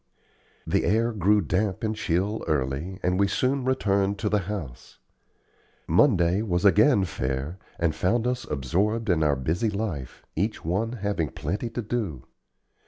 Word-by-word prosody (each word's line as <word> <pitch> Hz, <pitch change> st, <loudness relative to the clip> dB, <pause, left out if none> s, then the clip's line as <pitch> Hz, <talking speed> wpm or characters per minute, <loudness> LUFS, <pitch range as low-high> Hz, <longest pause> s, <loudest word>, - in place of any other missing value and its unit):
The -, -, +1 dB
air 115 Hz, +3 st, +2 dB
grew 105 Hz, 0 st, +3 dB
damp 95 Hz, +4 st, -1 dB
and 110 Hz, 0 st, 0 dB
chill 100 Hz, +2 st, -1 dB
early, 75 Hz, +6 st, -1 dB
and 90 Hz, +1 st, +1 dB
we 100 Hz, -, +4 dB
soon 130 Hz, +6 st, 0 dB
returned 100 Hz, -6 st, +1 dB
to 105 Hz, +2 st, -1 dB
the 105 Hz, -, +2 dB
house. 80 Hz, -13 st, -6 dB, 0.9 s
Monday 90 Hz, -, +4 dB
was 90 Hz, -4 st, -1 dB
again 100 Hz, -, +5 dB
fair, 70 Hz, +2 st, -3 dB, 0.2 s
and 85 Hz, -2 st, +1 dB
found 110 Hz, +9 st, +1 dB
us 125 Hz, 0 st, -1 dB
absorbed 100 Hz, -, 0 dB
in 85 Hz, -2 st, +2 dB
our 75 Hz, -2 st, +3 dB
busy 80 Hz, -, 0 dB
life, 100 Hz, -, -4 dB
each 105 Hz, +4 st, -2 dB
one 105 Hz, +8 st, 0 dB
having 100 Hz, -, -1 dB
plenty 100 Hz, -, -3 dB
to 115 Hz, +1 st, -4 dB
do. 105 Hz, -, -3 dB
100 Hz, 150 wpm, -26 LUFS, 80-110 Hz, 0.9 s, again